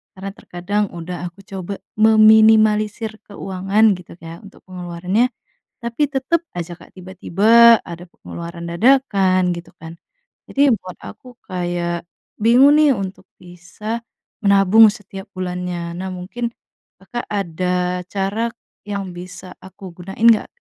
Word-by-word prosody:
Karena 195 +1 -7
terkadang 195 +4 -3
udah 175 +1 -6
aku 175 +3 -19
coba 195 0 -6 0.2
meminimalisir 215 0 +4
keuangan 195 +2 +1
gitu 180 - -13
kayak 165 +5 -11
untuk 200 - -18
pengeluarannya, 180 +5 -1 0.6
tapi 235 +5 0
tetep 270 +5 0 0.2
ajak 175 0 -5
Kak - - -24
tiba-tiba 210 +5 +4
ada 170 0 -8
pengeluaran 170 0 -9
dadakan 190 -4 +2
gitu 170 0 -10
kan. 165 +1 -10 0.5
Jadi 280 0 +3
buat 185 -4 -10
aku 250 -1 -12
kayak 175 -1 -3 0.3
bingung 250 +6 +6
nih 300 -2 +5
untuk 195 0 -6 0.2
bisa 180 +6 -7 0.4
menabung 200 +2 +6
setiap 195 -2 -10
bulannya. 180 -2 -4
Nah 190 - -4
mungkin 190 +7 -5 0.5
Kakak 195 +6 -7
ada 180 -1 -1
cara 200 +4 -2 0.4
yang 200 -2 -4
bisa 180 +1 -10
aku 190 0 -11
gunain 195 +5 -8
nggak 215 - +1
195 Hz, 120 wpm, -19 LUFS, 180-220 Hz, 0.6 s, bingung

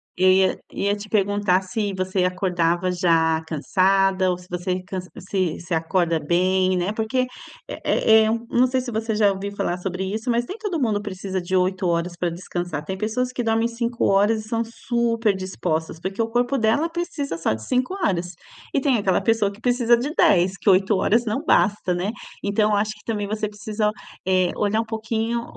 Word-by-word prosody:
Eu 185 +1 +4
ia 190 0 +3
ia 200 +1 0
te 210 +1 -9
perguntar 205 -2 +2
se 205 +2 -2
você 185 0 0
acordava 180 -1 0
já 165 -3 +2
cansada 190 +4 +2
ou 180 - 0
se 180 0 -16
você 180 +1 -2
cans 185 -1 -6 0.2
se 185 -5 -1
se 175 +1 -5
acorda 165 0 +1
bem, 185 +3 +2
né. 180 +4 -1
Porque, 225 +4 0 0.4
eh - - -7
eh 220 0 +4
eh, - - +1 0.2
não 250 +2 +3
sei 260 +1 0
se 250 -1 -5
você 220 0 -2
já 210 -2 +4
ouviu 195 +1 -4
falar 175 - -1
sobre 185 0 -3
isso, 215 +5 -3
mas 240 0 +1
nem 375 - -6
todo 385 -7 -2
mundo 220 -6 0
precisa 190 -2 -4
de 180 +2 -2
8h 180 -2 0
para 175 0 -1
descansar. 175 -3 -5
Tem 190 - -3
pessoas 225 +5 -1
que 250 - -3
dormem 225 0 +2
5h 225 -2 +1
e - - -15
são 230 +1 0
super 230 -2 0
dispostas, 170 -4 -3
porque 190 +5 -3
o 225 - +1
corpo 245 +3 +1
dela 225 +9 +2
precisa 330 - -3
só 165 - +1
de 110 - -10
5h. 250 - -1 0.4
E - - +1
tem 270 -2 +2
aquela 195 -3 +2
pessoa 225 -3 +2
que 200 - -14
precisa 240 -1 +3
de 275 +6 -3
10 190 - +3
que - - +2
8h 200 +4 +3
não 225 +7 -2
basta, 205 - +2
né? 185 +4 -1 0.3
Então 210 +1 +2
eu - - +3
acho 210 +1 0
que 210 - -19
também 210 -3 -2
você 215 0 -2
precisa, 210 0 -2 0.4
eh, 185 -1 +3
olhar 210 +1 +1
um - - -6
pouquinho 225 +1 -2
200 Hz, 190 wpm, -23 LUFS, 185-225 Hz, 0.4 s, Eu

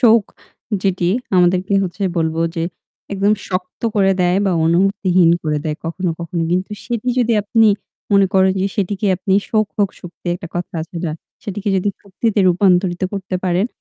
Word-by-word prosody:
শোক 230 -3 +6 0.6
যেটি 180 -3 +1 0.3
আমাদেরকে 180 +2 +3
হচ্ছে 180 +3 -5
বলব 160 -1 0 0.2
যে 165 - 0 0.5
একদম 200 +1 +2 0.2
শক্ত 180 0 -4
করে 195 -1 +4
দেয় 180 +2 +3
বা 190 - +2
অনুভূতিহীন 180 0 +3
করে 150 -1 0
দেয় 155 -1 -2
কখনো, 175 +1 -2
কখনো। 170 0 -3
কিন্তু 185 +3 0
সেটি 240 0 -3
যদি 240 -1 +2
আপনি 225 +2 +3 0.5
মনে 200 -1 +5
করেন 190 0 +4
যে - - +2
সেটিকে 200 +1 -1
আপনি, 190 +1 0 0.2
"শোক 215 -2 +2
হোক 200 -2 +2
শক্তি" 175 0 -12
একটা 175 -2 -8
কথা 175 0 -4
আছে 170 - -10
যা, 155 - -1 0.3
সেটিকে 205 +1 -4
যদি 190 +2 0
শক্তিতে 205 +2 -1
রূপান্তরিত 180 0 +2
করতে 190 -1 -4
পারেন, 185 +4 +1
190 Hz, 165 wpm, -18 LUFS, 175-200 Hz, 0.6 s, শোক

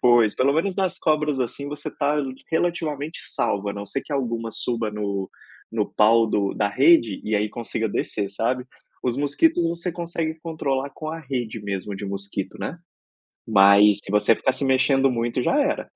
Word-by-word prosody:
Pois, 120 -3 +5
pelo 135 +2 +3
menos 180 +5 0
nas 190 -2 -1
cobras, 150 -3 +1
assim, 140 +3 -3
você 145 0 -6
tá 145 0 0 0.3
relativamente 160 -3 -1
salva, 100 0 -1
a - - -4
não 100 0 -6
ser 135 - -3
que - - -8
alguma 115 -4 -2
suba 115 -1 -2
no 100 -2 -3 0.4
no 110 -2 0
pau 115 +2 +4
do 100 -2 0
da 105 - 0
rede 125 - +4
e 105 0 0
aí 105 +1 0
consiga 115 0 -3
descer, 100 0 -2
sabe. 115 +5 -1 0.4
Os 125 -1 0
mosquitos 150 - +2
você 170 +1 -3
consegue 170 -2 -3
controlar 140 -4 -2
com 155 +2 -7
a 165 +1 -5
rede 120 -6 -4
mesmo 100 0 -4
de 95 - -6
mosquito, 100 0 -5
né, - - -4 0.7
mas 100 0 +6
se - - -9
você 105 +2 +4
ficar 130 - 0
se 130 +2 -4
mexendo 135 0 +3
muito 120 +1 -1
já 290 - +2
era. 290 +1 -1
125 Hz, 180 wpm, -23 LUFS, 105-150 Hz, 0.7 s, mas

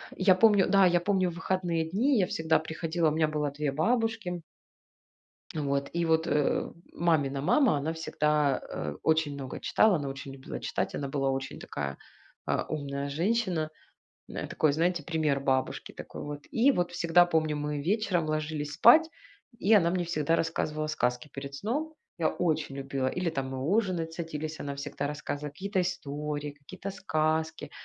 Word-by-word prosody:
Я 190 -1 +5
помню, 205 -1 +5
да, 195 0 +6
я 175 -1 +4
помню 185 -1 +2
выходные 175 -1 -1
дни, 245 - +2
я 185 - +3
всегда 160 -1 +2
приходила, 160 0 -1
у - - -2
меня 155 0 +2
было 150 -1 -1
2 145 0 -2
бабушки 225 - 0 1.1
а, - - -1
вот 140 0 -1
и 170 0 0
вот, 160 +1 +2
э, 150 -3 +1 0.2
мамина 145 -5 +1
мама, 225 - +4
она 155 +3 -2
всегда, 150 -3 +1
э, 75 -2 -4
очень 160 -2 +2
много 135 -2 -6
читала, 215 -3 +4
она 145 -4 -2
очень 135 0 -7
любила 135 -1 -7
читать, - - -2
она 140 - -3
была 135 -1 0
очень 135 0 -4
такая, 70 -1 -5 0.5
а, - - 0
умная 140 -2 -3
женщина. 175 0 0 0.6
Э, - - -5
такой, 155 -2 +2
знаете, 170 +1 +1
пример 155 -4 0
бабушки 130 -1 -1
такой - - -8
вот. 145 0 -6
И 245 +5 +4
вот 175 -6 -1
всегда 170 0 +5
помню, 155 -3 +1
мы 150 0 -2
вечером 185 -2 +1
ложились 155 -1 -2
спать, 310 - +7 0.5
и 210 - +2
она 170 -4 +5
мне 180 -1 0
всегда 165 -1 +1
рассказывала 155 -2 -1
сказки 125 -3 -1
перед 140 0 -7
сном. 285 - -2 0.2
Я 160 - +2
очень 155 -5 -1
любила 135 -1 -1
или 180 +3 -1
там 135 -3 -3
мы 130 - -4
ужинать 175 0 0
садились, 155 -2 -5
она 140 -1 -4
всегда 140 0 -4
рассказывала 150 0 -4
какие-то 190 +5 -2
истории, 150 -4 -3
какие-то 180 +7 -8
сказки. 160 -4 -1
160 Hz, 165 wpm, -29 LUFS, 145-180 Hz, 1.1 s, спать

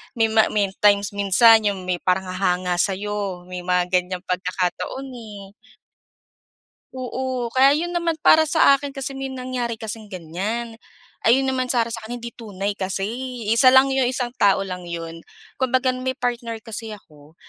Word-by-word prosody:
may 225 -1 +3
ma 220 -1 +4
may 200 -2 0
times 205 0 +4
minsan 215 +3 +5
'yong 195 -2 -2
may 180 -1 -1
parang 185 +1 +1
hahanga 180 -1 0
sa'yo 200 -2 -2
may 180 0 -7
mga 180 0 0
ganyang 180 0 0
pagkakataon, 180 +8 -2
eh. 205 -5 -10 1.4
Oo, 255 -1 -3
kaya 270 +3 +5
'yon 345 +3 -2
naman 340 -2 0
para 315 0 +6
sa 285 -3 +5
akin 285 0 -7
kasi 270 0 -4
may 270 0 -4
nangyari 255 -2 -4
kasing 220 -1 -7
ganyan. 205 +6 -5 0.5
Ayun 255 +4 +5
naman 255 -1 0
sa 245 -2 +2
sa 230 - -4
akin 240 +1 -6
hindi 235 - -5
tunay 205 -3 -5
kasi, 190 +1 -3 0.5
eh, 230 - +3
isa 255 0 +6
lang 270 +1 +6
'yong 265 -2 +2
isang 250 -1 -2
tao 195 -1 +4
lang 180 -2 -6
'yon. 165 -1 -6 0.4
Kumbaga 260 0 +2
may 255 +1 -3
partner 240 -3 -3
kasi 225 -1 -6
ako, 150 -5 -18
220 Hz, 165 wpm, -22 LUFS, 190-255 Hz, 1.4 s, para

